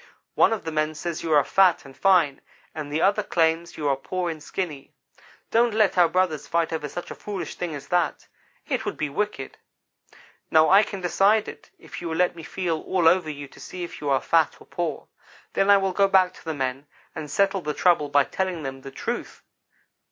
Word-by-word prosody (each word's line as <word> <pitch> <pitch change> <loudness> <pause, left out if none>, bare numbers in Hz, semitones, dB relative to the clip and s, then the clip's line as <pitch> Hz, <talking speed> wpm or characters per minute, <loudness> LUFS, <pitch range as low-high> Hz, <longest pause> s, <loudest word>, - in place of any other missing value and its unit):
One - - +4
of 225 - -2
the 160 - -4
men 155 0 -1
says 170 +1 -4
you 165 - -3
are 145 -1 +6
fat 185 -1 +3
and 135 0 -13
fine, 175 -8 +3 0.3
and 150 -2 -6
the 155 +2 0
other 200 +2 +3
claims 170 -3 0
you 150 - -2
are 140 - +3
poor 175 +6 -3
and 155 -2 -8
skinny. 150 -5 -5 0.6
Don't 235 -1 +3
let 215 -3 +3
our 175 -2 +5
brothers 180 -5 0
fight 170 -1 0
over 155 -2 -3
such 175 - -7
a - - -3
foolish 200 -3 -6
thing 170 -4 -4
as 140 - -9
that. 175 -2 0 0.4
It - - -1
would - - -4
be 150 - -2
wicked. 205 -6 -3 0.9
Now 160 +1 +5
I 195 +2 +8
can 200 -2 -5
decide 200 +4 +3
it, - - -10
if - - -10
you 170 - -4
will 160 - -2
let 180 -1 +2
me 165 - -9
feel 165 0 -2
all 180 -3 +1
over 175 -1 +4
you 145 -1 -6
to - - -17
see 180 -1 -7
if 170 - -8
you 145 - -2
are 135 -2 +2
fat 165 -2 +2
or - - -16
poor. 170 -2 -4 0.5
Then 195 - +2
I 200 - +8
will 195 -1 0
go 200 +1 +4
back 185 -1 +3
to - - -16
the 160 -1 -3
men 135 +1 -3 0.3
and 150 - -6
settle 195 +4 +1
the 150 -2 -3
trouble 170 -5 +3
by 145 0 +4
telling 185 0 -3
them 135 -1 -6
the 135 - -8
truth. 135 - -5
170 Hz, 220 wpm, -24 LUFS, 150-190 Hz, 0.9 s, I